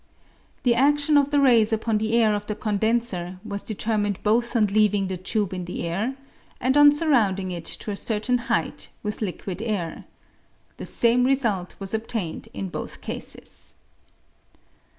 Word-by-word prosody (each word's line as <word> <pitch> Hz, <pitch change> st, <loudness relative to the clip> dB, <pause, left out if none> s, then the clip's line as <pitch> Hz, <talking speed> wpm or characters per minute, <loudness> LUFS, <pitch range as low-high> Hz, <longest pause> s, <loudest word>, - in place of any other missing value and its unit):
The 245 Hz, -, +4 dB
adion 290 Hz, +4 st, +3 dB
of 280 Hz, -, -3 dB
the 290 Hz, 0 st, +2 dB
rays 235 Hz, -6 st, +5 dB
upon 220 Hz, -1 st, 0 dB
the 220 Hz, +1 st, -1 dB
air 220 Hz, -2 st, +4 dB
of 205 Hz, 0 st, -3 dB
the 210 Hz, -, -2 dB
condenser 210 Hz, -4 st, -1 dB
was 200 Hz, -2 st, -3 dB
determined 210 Hz, -2 st, -1 dB
both 235 Hz, +3 st, +1 dB
on 220 Hz, -2 st, +4 dB
leaving 205 Hz, -1 st, +2 dB
the 190 Hz, -, -2 dB
tube 195 Hz, +2 st, -1 dB
in 180 Hz, -1 st, -4 dB
the 175 Hz, -1 st, -4 dB
air 210 Hz, +10 st, -2 dB, 0.4 s
and 260 Hz, +2 st, +1 dB
on 290 Hz, 0 st, +8 dB
sur 305 Hz, +2 st, 0 dB
rounding 195 Hz, -7 st, +2 dB
it 170 Hz, -2 st, -6 dB
to 210 Hz, -, -4 dB
a -, -, -3 dB
certain 225 Hz, +4 st, 0 dB
height -, -, -1 dB
with 210 Hz, +1 st, -4 dB
liquid 190 Hz, -1 st, -4 dB
air. 205 Hz, -8 st, -3 dB, 0.7 s
The -, -, -6 dB
same 240 Hz, +1 st, +3 dB
result 235 Hz, -9 st, +1 dB
was 195 Hz, +1 st, -4 dB
obtained 220 Hz, -6 st, -3 dB
in 95 Hz, -1 st, -5 dB
both -, -, -7 dB
cases. -, -, -7 dB
215 Hz, 165 wpm, -24 LUFS, 195-240 Hz, 0.7 s, on